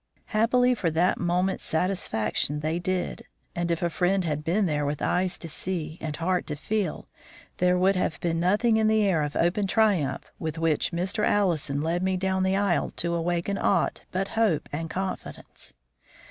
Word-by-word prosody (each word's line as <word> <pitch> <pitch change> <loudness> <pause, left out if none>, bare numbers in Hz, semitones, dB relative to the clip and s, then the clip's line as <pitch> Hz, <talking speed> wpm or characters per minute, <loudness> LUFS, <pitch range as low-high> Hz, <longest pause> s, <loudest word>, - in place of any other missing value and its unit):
Happily 245 +3 +3
for 195 -8 0
that 165 +3 +1
moment's 180 +2 0
satisfaction 150 - 0
they 160 +3 -1
did, 185 0 -2 0.3
and 175 0 -1
if 170 0 -1
a 170 - +2
friend 185 +2 +1
had 150 -2 -2
been 185 +6 +1
there 150 -3 0
with 145 0 -2
eyes 180 0 0
to 165 - -8
see 165 -1 -3
and 155 -2 -3
heart 180 +3 -1
to 150 - -3
feel, 185 +5 -2 0.5
there 180 0 +3
would 190 +2 +3
have 180 - -1
been 165 -1 -1
nothing 210 +6 +3
in 220 -1 +3
the 220 0 +3
air 185 -6 +2
of 145 -1 -3
open 185 +4 +1
triumph 200 -9 +1
with 160 0 -4
which 165 -2 +1
Mr. 185 +5 -1
Allison 160 -9 +1
led 170 +2 0
me 190 0 0
down 190 0 0
the 190 +1 +2
aisle 200 -3 +1
to 170 0 -1
awaken 175 +3 -1
aught - - +1
but 190 +2 -2
hope 220 -9 +1
and 165 +2 -3
confidence. 185 - -6
180 Hz, 180 wpm, -26 LUFS, 165-195 Hz, 0.5 s, Happily